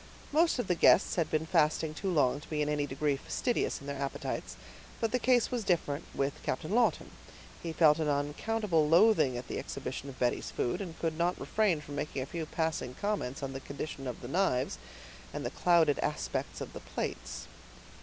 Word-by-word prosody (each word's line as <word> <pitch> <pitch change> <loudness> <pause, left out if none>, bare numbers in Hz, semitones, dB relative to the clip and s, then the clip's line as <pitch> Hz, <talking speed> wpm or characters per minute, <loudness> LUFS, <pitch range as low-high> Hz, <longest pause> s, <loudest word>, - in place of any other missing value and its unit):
Most 325 +2 +3
of 245 - -1
the 180 - +2
guests 175 - +5
had 170 -3 +1
been 155 0 0
fasting 155 0 +2
too 190 +5 -3
long 145 -6 +3
to 150 - -14
be 150 -1 0
in 150 - -1
any 145 -1 0
degree 140 +1 0
fastidious 240 - -1
in 140 - -12
their 140 -1 -4
appetites; 140 - -3 0.4
but 225 -2 0
the 250 - +2
case 245 -1 +3
was 245 -3 -1
different 170 -5 0
with 140 +1 -1
Captain 155 +6 -3
Lawton; 235 +2 +2 0.5
he 165 - -3
felt 155 -1 +5
an 155 - 0
unaccountable 155 +4 +1
loathing 165 - +5
at 120 - -6
the - - -3
exhibition 140 - -5
of 130 - -10
Betty's 120 -1 0
food, 125 +11 -1
and 175 -4 -6
could 165 -1 -2
not 175 +1 +1
refrain 200 -8 +1
from 145 -1 -7
making 145 -2 -2
a - - -5
few 160 +2 -5
passing 160 -6 -2
comments 200 -10 -2
on 135 0 -3
the 135 - -4
condition 140 0 -6
of 125 - -5
the 120 - -6
knives, 130 - +1 0.6
and - - -3
the - - -2
clouded 165 -5 +3
aspect 150 - -2
of - - -6
the - - -6
plates. - - -5
155 Hz, 200 wpm, -31 LUFS, 140-180 Hz, 0.6 s, guests